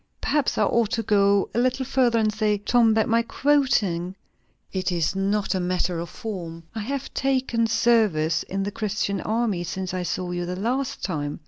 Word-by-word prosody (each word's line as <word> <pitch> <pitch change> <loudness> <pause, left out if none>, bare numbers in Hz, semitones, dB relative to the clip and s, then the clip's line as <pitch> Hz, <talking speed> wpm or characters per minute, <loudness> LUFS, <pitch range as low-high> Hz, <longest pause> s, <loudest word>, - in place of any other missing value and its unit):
"Perhaps 295 -3 0
I - - +3
ought 235 -3 +2
to 225 - 0
go 200 -1 +3
a - - +1
little 255 +2 +1
further, 250 -3 +2
and 215 -1 +2
say, 215 -1 +1
Tom, 225 +2 +3
that 220 - +2
my 230 +1 +3
quoting 230 -10 +1 0.6
it 185 -1 -1
is 170 0 0
not 200 +2 0
a 190 - 0
matter 180 -1 -1
of 170 0 -5
form. 170 -8 -6
I 225 - -4
have 270 +5 -4
taken 260 -4 +1
service 215 -9 +2
in 195 +1 -3
the 200 - -3
Christian 205 -2 -2
army, 215 -5 -1
since 185 +1 -4
I 185 - -2
saw 180 0 -3
you 175 0 -3
the 180 - -3
last 250 +5 -2
time. 145 -5 -3
210 Hz, 190 wpm, -24 LUFS, 180-235 Hz, 0.6 s, I